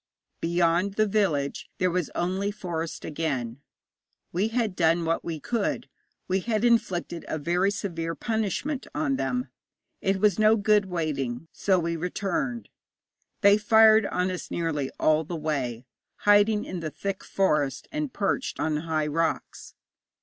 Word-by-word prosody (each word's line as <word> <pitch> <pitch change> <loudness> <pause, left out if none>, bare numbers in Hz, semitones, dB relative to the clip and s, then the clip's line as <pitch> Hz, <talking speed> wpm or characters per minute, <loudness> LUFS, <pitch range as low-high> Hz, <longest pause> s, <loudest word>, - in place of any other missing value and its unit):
Beyond 170 +3 +1
the 215 - +3
village 185 -10 0
there 185 -1 +1
was 180 -2 -1
only 190 +3 0
forest 175 -6 -4
again. 140 -6 -3 0.7
We 190 +5 +1
had 225 -4 -1
done 165 0 +2
what 165 +1 0
we 165 -2 -4
could: 225 - -2 0.4
we 190 +1 +1
had 220 +2 0
inflicted 195 -8 +1
a - - -2
very 175 +6 +1
severe 170 -5 -3
punishment 225 - -2
on 285 -4 0
them; 250 -1 -2 0.5
it 195 0 +1
was 210 0 +3
no 215 +1 +6
good 210 -1 +3
waiting, 155 -5 -3
so 190 -2 +1
we 170 -1 -1
returned. 200 - -2 0.7
They 200 0 +6
fired 220 0 +6
on 180 +1 0
us 180 - -6
nearly 155 -5 -1
all 155 0 +3
the 170 +3 -5
way, 130 -6 -2 0.4
hiding 205 +1 +5
in 185 - -5
the 160 -2 -3
thick 195 +5 -4
forest, 150 -8 0
and 300 -3 -2
perched 215 +6 -1
on 155 -1 0
high 155 -1 -1
rocks. 160 +2 -2
180 Hz, 145 wpm, -26 LUFS, 160-210 Hz, 0.7 s, no